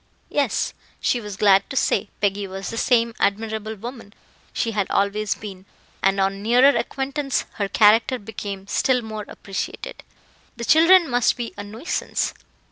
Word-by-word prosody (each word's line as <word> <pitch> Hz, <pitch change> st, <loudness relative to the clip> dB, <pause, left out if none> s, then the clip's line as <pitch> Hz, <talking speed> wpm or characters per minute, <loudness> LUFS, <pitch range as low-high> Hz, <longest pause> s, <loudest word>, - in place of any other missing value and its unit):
Yes; 285 Hz, -1 st, 0 dB, 0.3 s
she 245 Hz, -, 0 dB
was 205 Hz, -3 st, -7 dB
glad 200 Hz, -2 st, +4 dB
to -, -, -6 dB
say, 205 Hz, -4 st, +1 dB
Peggy 200 Hz, 0 st, 0 dB
was 190 Hz, +1 st, -6 dB
the -, -, -5 dB
same 235 Hz, -1 st, +2 dB
admirable 220 Hz, +1 st, -1 dB
woman 230 Hz, -1 st, -9 dB, 0.4 s
she 230 Hz, -, -1 dB
had 205 Hz, -3 st, -1 dB
always 200 Hz, +1 st, 0 dB
been, 195 Hz, -2 st, -10 dB, 0.3 s
and 195 Hz, +1 st, +2 dB
on 195 Hz, +1 st, 0 dB
nearer 250 Hz, +6 st, +5 dB
acquaintance 275 Hz, 0 st, -2 dB
her 200 Hz, -, +1 dB
character 225 Hz, +5 st, +4 dB
became 200 Hz, -3 st, -7 dB
still 250 Hz, +4 st, +1 dB
more 215 Hz, -1 st, -6 dB
appreciated. 195 Hz, -1 st, -6 dB, 0.6 s
The 235 Hz, -, -4 dB
children 335 Hz, +4 st, +6 dB
must 245 Hz, -2 st, +2 dB
be 240 Hz, -1 st, -5 dB
a 205 Hz, -, -6 dB
nuisance? 225 Hz, -, -3 dB
220 Hz, 150 wpm, -22 LUFS, 200-245 Hz, 0.6 s, children